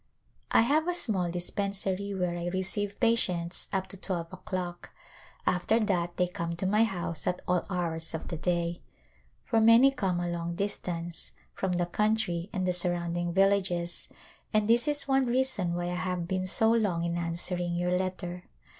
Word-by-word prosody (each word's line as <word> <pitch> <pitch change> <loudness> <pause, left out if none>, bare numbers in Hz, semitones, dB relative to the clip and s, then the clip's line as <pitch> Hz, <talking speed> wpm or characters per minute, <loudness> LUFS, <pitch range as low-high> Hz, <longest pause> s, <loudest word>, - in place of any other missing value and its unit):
I - - +5
have 300 +8 +2
a 355 - +1
small 195 - +1
dispensary 195 +2 -2
where 180 -2 -1
I 175 0 -3
receive 195 +3 -2
patients 185 -7 +1
up 190 -1 0
to 195 - -7
twelve 175 -2 -4
o'clock; 180 -1 -5 0.6
after 185 +5 +2
that 175 -5 0
they 180 - +3
come 170 -1 -4
to 175 - -3
my 210 +4 +4
house 175 -6 -3
at 180 0 -1
all 180 -1 +1
hours 165 -4 -1
of 160 - -6
the 170 - -3
day, 170 +1 -1 0.6
for 225 -1 +2
many 230 +5 +7
come 190 -9 -1
a 175 - -1
long 170 0 -3
distance, 175 -3 -4 0.2
from 190 -1 -1
the 175 0 +1
country 205 -2 0
and 185 -4 -1
the 180 - +2
surrounding 175 -1 0
villages, 185 -2 +1 0.4
and 215 -1 +2
this 235 +5 +4
is 295 -1 0
one 270 -1 +3
reason 240 -8 +1
why 175 - -2
I - - -2
have 180 -2 -2
been 185 0 -1
so 220 +4 +3
long 205 -7 +1
in 170 0 -1
answer 170 +1 0
ing 175 -1 -1
your 180 +1 +1
letter. 180 -1 -3
180 Hz, 175 wpm, -29 LUFS, 175-205 Hz, 0.6 s, many